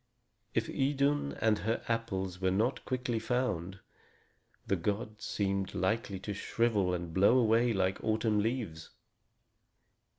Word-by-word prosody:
If 115 0 +1
Idun 140 +1 +1
and 110 -2 +1
her 110 +2 -1
apples 95 -6 -2
were 95 - +3
not 110 +8 0
quickly 125 -3 -1
found, 110 -7 -1 0.9
the 95 - +1
gods 105 +5 -3
seemed 100 -1 -1
likely 100 +2 0
to 105 +1 -4
shrivel 105 -2 +1
and 85 -2 -5
blow 100 +7 +5
away 115 0 +4
like 95 -2 0
autumn 110 -1 +1
leaves. 105 -8 -2
110 Hz, 125 wpm, -32 LUFS, 95-120 Hz, 0.9 s, blow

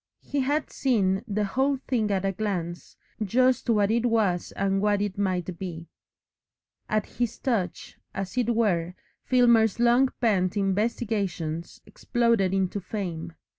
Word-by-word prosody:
He 285 - -2
had 290 +3 0
seen 195 -8 +1
the 210 0 -1
whole 265 +7 +1
thing 225 -5 +1
at 195 -1 0
a 195 - +1
glance, 175 -5 -4 0.3
just 255 +5 +2
what 210 -2 +3
it 235 +1 +2
was 210 -7 +1
and 195 0 0
what 205 -1 +2
it 205 -2 -2
might 185 -3 -2
be. 170 -3 -6 1.0
At 215 -1 +1
his 240 -1 -3
touch, 205 -9 -2
as 195 +1 -5
it 240 -2 +1
were, 180 -6 +1 0.3
Filmer's 235 -4 +4
long 240 +2 +4
pent 200 -5 +1
investigations 195 -5 -1
exploded 235 -6 +1
into 190 +1 0
fame. 175 -4 -5
205 Hz, 135 wpm, -26 LUFS, 185-235 Hz, 1.0 s, Filmer's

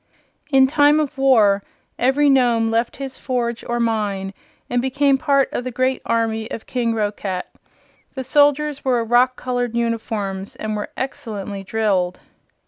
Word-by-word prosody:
In 270 -2 +5
time 290 +2 +4
of 285 -3 -3
war 215 -7 +4 0.4
every 270 +4 +3
Nome 240 -4 +3
left 230 +1 0
his 270 -1 -7
forge 240 -3 -2
or 240 0 -2
mine 205 -4 -1 0.3
and 245 0 0
became 270 +1 +2
part 275 -2 +2
of - - -2
the 255 - -3
great 255 +1 0
army 225 -1 0
of 220 - -7
King 235 -2 -1
Roquat. 205 -3 -2 0.7
The 265 - -3
soldiers 290 +2 +2
wore 245 -3 +1
rock 245 +2 +3
colored 245 -2 -2
uniforms 220 -4 -3
and 215 0 -4
were 210 - -4
excellently 205 -6 -5
drilled. 190 -4 0
240 Hz, 145 wpm, -20 LUFS, 220-265 Hz, 0.7 s, In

